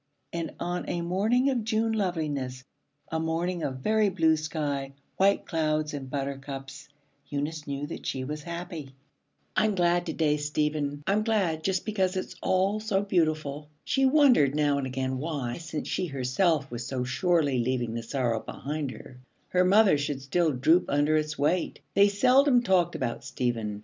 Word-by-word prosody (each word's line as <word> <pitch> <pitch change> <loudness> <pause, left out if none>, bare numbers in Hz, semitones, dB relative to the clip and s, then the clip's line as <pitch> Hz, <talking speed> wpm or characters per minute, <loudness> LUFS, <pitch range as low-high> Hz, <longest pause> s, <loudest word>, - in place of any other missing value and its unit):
And 165 -2 -4
on 175 +1 -3
a 175 -1 -1
morning 215 +10 +2
of 245 -4 -1
June 225 +1 +1
loveliness, 150 -10 -2 0.5
a 160 - 0
morning 165 +2 -1
of 130 -4 -3
very 215 +4 +3
blue 160 -4 +3
sky, 145 -3 -3 0.2
white 195 +1 +3
clouds, 155 -2 0
and 135 -2 -6
butter 140 0 -3
cups, 135 0 -8 0.4
Eunice 150 +2 -3
knew 140 0 -3
that 150 - -7
she 130 - -2
was 150 +3 -5
happy. 170 -4 -7 0.6
'I'm 215 -1 +2
glad 175 0 +2
to 160 - -2
day, 150 -2 +2
Stephen, 150 -1 -1
I'm 205 +2 +2
glad, 190 -8 0
just 190 0 0
because 190 -3 0
it's 185 - -4
all 195 +3 +1
so 210 -2 0
beautiful.' 155 -6 0
She 270 -1 +2
wondered 260 - +5
now 145 -2 +2
and 135 - -2
again 130 0 -2
why, 140 -5 -3
since 160 -2 -5
she 180 - -1
herself 140 +2 0
was 120 0 -4
so 130 -2 -2
surely 145 0 +1
leaving 120 -1 -1
the 115 - -3
sorrow 115 -1 -1
behind 145 +4 -4
her, 125 0 -11 0.3
her 180 0 +3
mother 195 -4 +5
should 140 -1 -3
still 160 +4 +1
droop 155 +7 +3
under 145 +2 +2
its 155 0 -1
weight. 160 +5 0
They 200 +1 +6
seldom 250 +5 +4
talked 180 -4 +2
about 120 -3 -3
Stephen. 115 -4 -2
155 Hz, 170 wpm, -27 LUFS, 140-185 Hz, 0.6 s, They